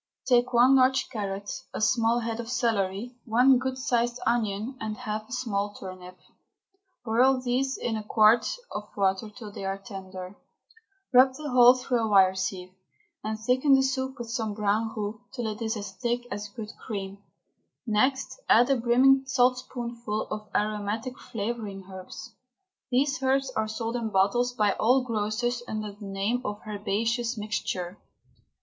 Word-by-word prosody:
Take 245 0 +3
one 250 +2 +6
large 260 0 +3
carrot, 200 -2 -4 0.2
a - - -2
small 230 +2 +2
head 225 0 -3
of 230 -1 -5
celery, 230 0 -1
one 250 +3 +5
good 260 0 -3
sized 240 -2 0
onion, 225 +1 0
and 215 -1 -3
half 215 +1 -5
a - - -15
small 205 -5 -2
turnip, 185 -1 -9
and - - -33 0.7
boil 255 +4 +4
these 255 +2 -1
in 230 - -2
a 215 - -4
quart 215 +2 +4 0.2
of 210 0 -6
water 195 +2 +1
till 210 -1 -10
they 200 - -8
are 195 0 -2
tender. 190 -1 -9 0.8
Rub 260 +1 +6
the 300 -1 -5
whole 250 0 +8
through 250 -1 -1
a 225 - 0
wire 190 -3 +5
sieve, 190 -1 -4 0.5
and 215 0 -3
thicken 255 +5 +3
the 265 - +3
soup 265 0 -2
with 235 -1 -6
some 220 -3 -2
brown 215 +1 0
roux 210 +2 -4
till 240 -3 -3
it 215 0 -4
is 225 0 -1
as 200 -2 -6
thick 240 +4 -2
as 205 +1 -4
good 215 0 -7
cream. 200 -3 -5 0.7
Next 260 - +1
add 240 +4 +6
a 270 - +3
brimming 260 +3 +4
saltspoonful 245 -3 -1
of 210 -1 -5
aromatic 215 +4 -2
flavouring 210 -3 -5
herbs. 190 -1 -9 0.6
These 270 +2 +1
herbs 270 0 +1
are 220 -4 -1
sold 225 +2 -3
in 230 -2 -2
bottles 215 +6 +2
by 210 -4 +2
all 250 +4 +4
grocers 235 +1 -1
under 215 -1 -4
the 205 0 -10
name 200 +5 -1
of 205 -2 -4
Herbaceous 225 +3 -1
Mixture. 200 -3 -3
225 Hz, 160 wpm, -27 LUFS, 205-250 Hz, 0.8 s, whole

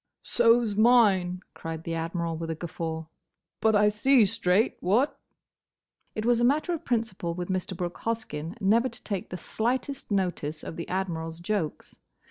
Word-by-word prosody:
"So 235 0 +4
's 210 -2 -3
mine," 200 -6 +4
cried 165 0 -6
the 165 - -3
Admiral, 165 0 -2
with 165 0 -5
a 160 - -1
guffaw; 160 -1 -4 0.5
"but 220 -1 +3
I 210 0 +5
see 230 +3 +4
straight, 205 0 +1
what?" 230 +11 +1 1.0
It 215 - -2
was 240 -1 +4
a - - +3
matter 300 +8 +2
of 335 -1 -4
principle 220 - -1
with 180 +1 -4
Mr. 185 -1 -2
Brooke 175 -1 -4
Hoskyn 220 -8 -3
never 225 +5 +3
to 240 +1 -13
take 195 -4 -3
the 180 - -5
slightest 250 +7 -2
notice 175 -6 -1
of - - -6
the 170 - -6
Admiral's 165 -3 -3
jokes. 175 -3 -3
190 Hz, 165 wpm, -27 LUFS, 170-230 Hz, 1.0 s, I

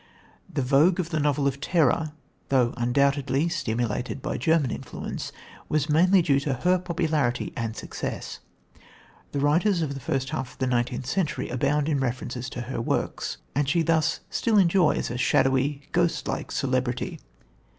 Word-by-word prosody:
The 140 - -1
vogue 150 +8 +4
of 170 -1 -2
the 155 - 0
novel 145 -1 +1
of 140 0 -1
terror, 155 -2 +2 0.4
though 125 -3 +3
undoubtedly 140 +5 +1
stimulated 120 -1 -2
by - - -3
German 160 -6 +2
influence, - - -5 0.4
was 150 -1 +1
mainly 180 +4 +5
due 140 -3 +3
to 140 -1 -1
her 180 +8 +2
popularity 155 -8 -1
and 115 -1 -3
success. - - -5 0.9
The 140 - -2
writers 170 +5 +2
of 140 -3 -2
the 135 - -6
first 135 +1 -2
half 130 -5 -4
of - - -22
the 130 - 0
nineteenth 125 0 0
century 165 +4 -1
abound 140 +4 +1
in 150 -3 +1
references 125 0 -3
to 125 - -5
her 120 0 -4
works, - - -2 0.2
and 140 0 +1
she 165 +1 +2
thus 160 -1 +1
still 225 -3 +2
enjoys 180 -8 +3
a 125 - -4
shadowy, 135 +3 +2
ghost 175 -1 +1
like - - -3
celebrity. 130 -2 -1
140 Hz, 160 wpm, -26 LUFS, 130-160 Hz, 0.9 s, mainly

